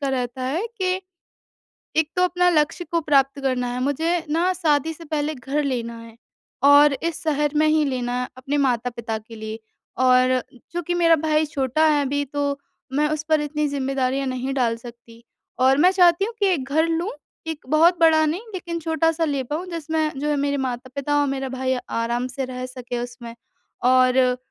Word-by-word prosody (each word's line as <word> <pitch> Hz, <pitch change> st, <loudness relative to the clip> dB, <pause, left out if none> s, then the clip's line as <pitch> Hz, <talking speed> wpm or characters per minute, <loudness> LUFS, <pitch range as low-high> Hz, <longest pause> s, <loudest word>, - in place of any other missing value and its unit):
का 280 Hz, -, -1 dB
रहता 255 Hz, -1 st, -2 dB
है 315 Hz, -, -1 dB
कि 370 Hz, 0 st, 0 dB, 1.0 s
एक 320 Hz, -1 st, +2 dB
तो 360 Hz, -, +3 dB
अपना 360 Hz, 0 st, +2 dB
लक्ष्य 325 Hz, +2 st, +1 dB
को 335 Hz, -, +1 dB
प्राप्त 280 Hz, -2 st, +2 dB
करना 255 Hz, -2 st, 0 dB
है, 250 Hz, -, -3 dB
मुझे 320 Hz, +5 st, 0 dB
ना 345 Hz, +4 st, +2 dB
शादी 320 Hz, -3 st, +1 dB
से 330 Hz, +1 st, -12 dB
पहले 305 Hz, 0 st, -2 dB
घर 275 Hz, +4 st, -2 dB
लेना 235 Hz, -4 st, -3 dB
है 230 Hz, 0 st, -13 dB, 0.5 s
और 285 Hz, +1 st, +7 dB
इस 335 Hz, +1 st, -3 dB
शहर 295 Hz, -2 st, +1 dB
में 310 Hz, +1 st, +4 dB
ही 310 Hz, 0 st, +3 dB
लेना 250 Hz, -3 st, -2 dB
है, 250 Hz, -, -3 dB
अपने 270 Hz, +3 st, -3 dB
माता-पिता 235 Hz, -4 st, -1 dB
के 225 Hz, +1 st, -13 dB
लिये 220 Hz, 0 st, -6 dB, 0.5 s
और 255 Hz, 0 st, +4 dB, 0.3 s
चूँकि 350 Hz, 0 st, -2 dB
मेरा 335 Hz, -2 st, +4 dB
भाई 310 Hz, 0 st, +1 dB
छोटा 285 Hz, +2 st, +1 dB
है 295 Hz, -1 st, +3 dB
अभी, 285 Hz, +1 st, -1 dB
तो 285 Hz, 0 st, -2 dB, 0.3 s
मैं 300 Hz, +2 st, +2 dB
उस 305 Hz, 0 st, -2 dB
पर 310 Hz, -1 st, +3 dB
इतनी 300 Hz, 0 st, -1 dB
ज़िम्मेदारियाँ 270 Hz, -1 st, -1 dB
नहीं 260 Hz, +1 st, -3 dB
डाल 235 Hz, -3 st, +1 dB
सकती 235 Hz, 0 st, -13 dB, 0.4 s
और 260 Hz, +1 st, +4 dB
मैं 360 Hz, +4 st, +6 dB
चाहती 360 Hz, 0 st, +4 dB
हूँ 460 Hz, +2 st, -5 dB
कि 400 Hz, -, +3 dB
एक 345 Hz, -8 st, +1 dB
घर 315 Hz, +3 st, +3 dB
लूँ, 335 Hz, +5 st, -1 dB, 0.4 s
एक 315 Hz, -4 st, -6 dB
बहुत 330 Hz, +4 st, +4 dB
बड़ा 315 Hz, -1 st, +5 dB
नहीं 325 Hz, +6 st, -1 dB
लेकिन 340 Hz, -2 st, -4 dB
छोटा-सा 325 Hz, +1 st, +1 dB
ले 280 Hz, -3 st, -1 dB
पाऊँ, 305 Hz, +8 st, -4 dB
जिसमें 320 Hz, -2 st, -1 dB
जो 295 Hz, -, -1 dB
है 295 Hz, -, +1 dB
मेरे 285 Hz, 0 st, 0 dB
माता-पिता 265 Hz, +3 st, -2 dB
और 290 Hz, -, +2 dB
मेरा 270 Hz, -1 st, -3 dB
भाई 260 Hz, 0 st, -1 dB, 0.2 s
आराम 235 Hz, +2 st, -1 dB
से 260 Hz, +1 st, -4 dB
रह 255 Hz, 0 st, -6 dB
सके 250 Hz, -1 st, -6 dB
उसमें 240 Hz, -1 st, -8 dB, 0.6 s
और 255 Hz, 0 st, +4 dB
285 Hz, 190 wpm, -22 LUFS, 255-320 Hz, 1.0 s, और